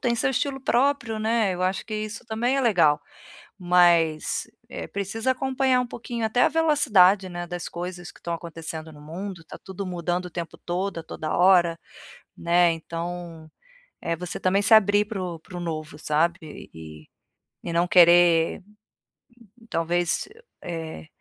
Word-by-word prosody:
tem 235 Hz, -1 st, 0 dB
seu 265 Hz, -, +1 dB
estilo 270 Hz, +1 st, -2 dB
próprio, 240 Hz, -4 st, +1 dB
né. 220 Hz, -3 st, +1 dB
Eu 180 Hz, -, -4 dB
acho 185 Hz, +1 st, -1 dB
que 215 Hz, -, -5 dB
isso 215 Hz, +3 st, -5 dB
também 240 Hz, +4 st, 0 dB
é -, -, +2 dB
legal. 170 Hz, -, +3 dB, 0.6 s
Mas, 175 Hz, -3 st, +2 dB, 0.2 s
eh, -, -, -7 dB
precisa 200 Hz, +5 st, -3 dB
acompanhar 260 Hz, 0 st, +1 dB
um 250 Hz, -, 0 dB
pouquinho 235 Hz, -1 st, -5 dB
até 220 Hz, +3 st, +1 dB
a -, -, +5 dB
velocidade, 215 Hz, -, +4 dB
né, 175 Hz, 0 st, -5 dB
das 175 Hz, 0 st, -6 dB
coisas 175 Hz, 0 st, -6 dB
que -, -, -20 dB
estão 170 Hz, -, -4 dB
acontecendo 160 Hz, -1 st, -7 dB
no 150 Hz, -, -14 dB
mundo. 170 Hz, +3 st, -7 dB
Tá -, -, -11 dB
tudo 190 Hz, +1 st, -6 dB
mudando 180 Hz, 0 st, -2 dB
o -, -, -7 dB
tempo 170 Hz, -2 st, -6 dB
todo, 180 Hz, +1 st, -3 dB
a -, -, -8 dB
toda 155 Hz, -1 st, -6 dB
hora, 175 Hz, -2 st, +4 dB, 0.6 s
né. 170 Hz, 0 st, +3 dB
Então, 165 Hz, 0 st, -7 dB, 0.5 s
eh, 170 Hz, -, -2 dB
você 175 Hz, +1 st, -5 dB
também 195 Hz, +2 st, +1 dB
se 220 Hz, -, +2 dB
abrir 205 Hz, -1 st, +6 dB
para 210 Hz, -3 st, -5 dB
o 170 Hz, -3 st, -5 dB
para 180 Hz, +2 st, -11 dB
o -, -, -5 dB
novo, 155 Hz, -3 st, -5 dB
sabe, 160 Hz, +1 st, -2 dB
e 80 Hz, -1 st, -12 dB, 0.6 s
e 170 Hz, -, -3 dB
não 170 Hz, +1 st, +2 dB
querer, 175 Hz, 0 st, +5 dB, 1.1 s
talvez, 170 Hz, -, 0 dB, 0.3 s
eh, 160 Hz, -, -6 dB
175 Hz, 160 wpm, -25 LUFS, 165-215 Hz, 1.1 s, abrir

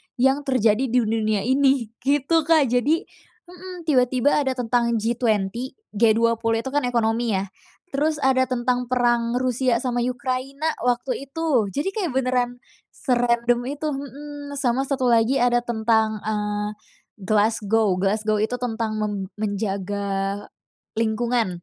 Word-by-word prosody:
yang 270 Hz, +3 st, +1 dB
terjadi 255 Hz, -1 st, +2 dB
di 250 Hz, +2 st, +2 dB
dunia 215 Hz, -2 st, 0 dB
ini, 265 Hz, -2 st, +2 dB
gitu, 290 Hz, +4 st, +1 dB
Kak. 310 Hz, -7 st, +4 dB
Jadi 290 Hz, +8 st, +2 dB, 0.5 s
hmm, 360 Hz, 0 st, -9 dB
tiba-tiba 260 Hz, -2 st, +2 dB
ada 265 Hz, -3 st, 0 dB
tentang 235 Hz, -1 st, +1 dB
G20, 220 Hz, -3 st, 0 dB, 0.4 s
G20 230 Hz, +1 st, +2 dB
itu 265 Hz, -, -4 dB
kan 290 Hz, 0 st, +1 dB
ekonomi 230 Hz, -2 st, +1 dB
ya. 190 Hz, 0 st, -3 dB, 0.4 s
Terus 300 Hz, +3 st, +1 dB
ada 260 Hz, -1 st, +4 dB
tentang 250 Hz, 0 st, -1 dB
perang 240 Hz, -1 st, +2 dB
Rusia 255 Hz, -1 st, +1 dB
sama 245 Hz, -2 st, -1 dB
Ukraina 260 Hz, +4 st, -2 dB
waktu 250 Hz, +2 st, -1 dB
itu. 275 Hz, -7 st, 0 dB
Jadi 290 Hz, -, -1 dB
kayak 375 Hz, -8 st, -1 dB
beneran 250 Hz, -1 st, 0 dB, 0.3 s
serandom 240 Hz, -1 st, +1 dB
itu, 290 Hz, +3 st, -3 dB
mmm. 285 Hz, +1 st, -7 dB
Sama 260 Hz, 0 st, +1 dB
satu 265 Hz, -3 st, 0 dB
lagi 230 Hz, +3 st, +3 dB
ada 240 Hz, 0 st, +3 dB
tentang, 220 Hz, -2 st, +1 dB
eee, 210 Hz, -1 st, -2 dB, 0.5 s
Glasgow. 215 Hz, 0 st, +2 dB
Glasgow 215 Hz, +2 st, +1 dB
itu 245 Hz, +3 st, -1 dB
tentang 225 Hz, -3 st, -2 dB
men 210 Hz, -1 st, -1 dB, 0.3 s
menjaga 200 Hz, -1 st, -2 dB, 0.6 s
lingkungan. 230 Hz, -1 st, +1 dB
240 Hz, 130 wpm, -23 LUFS, 220-265 Hz, 0.6 s, Kak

